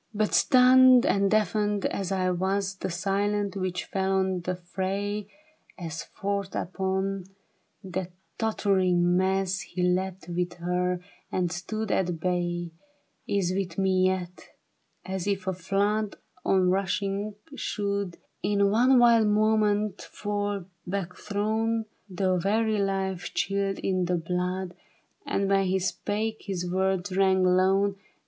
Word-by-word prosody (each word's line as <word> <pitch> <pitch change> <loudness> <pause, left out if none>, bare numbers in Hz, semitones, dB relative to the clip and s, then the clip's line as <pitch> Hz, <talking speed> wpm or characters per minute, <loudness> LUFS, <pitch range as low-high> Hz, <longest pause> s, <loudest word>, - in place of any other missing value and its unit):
THE 215 - -10
BARRICADE. 215 0 +3
But - - -10
stunned 255 -1 +7
and 200 0 +2
deafened 210 0 +1
as 195 -1 -2
I 185 -1 +1
was, 190 +2 0
The 190 - -3
silence 200 +3 -1
which 185 -2 -2
fell 190 0 -1
on 190 -1 +1
the 180 +1 -2
fray, 195 +3 -3 0.5
As 165 -3 -5
forth 200 -1 -3
upon 190 +1 -2 0.6
that 185 -1 -4 0.3
tottering 185 -5 +2
mass 190 +1 +1
He 180 -1 -4
leaped 185 +1 0
with 175 0 -2
her, 180 +1 -1 0.3
and 180 -2 0
stood 210 +5 -3
at 175 -3 0
bay, 175 -1 -1 0.6
Is 190 -3 +1
with 185 -4 -3
me 190 -1 +3
yet; 180 -1 -4 0.6
as 190 0 -3
if 195 -2 -1
a 190 - 0
flood 200 +4 0 0.3
On 185 -1 +3
rushing, 195 +2 -1 0.2
should 200 -7 -2 0.2
In 200 0 +2
one 250 +4 +5
wild 235 -2 +6
moment 210 -1 +2
fall 205 -2 -3 0.2
backthrown 210 +4 -1
— - - -41
The 185 0 +1
very 215 +4 +1
life 195 -2 -2
chilled 195 0 0
in 185 -2 0
the 180 0 +1
blood, 180 +2 -2 0.5
And 195 - 0
when 195 0 +3
he 190 +1 +1
spake 205 +4 -2
his 180 -3 -2
w^ords 190 +1 0
rang 190 -1 +3
lone. 190 +2 +3
195 Hz, 135 wpm, -27 LUFS, 180-205 Hz, 0.6 s, stunned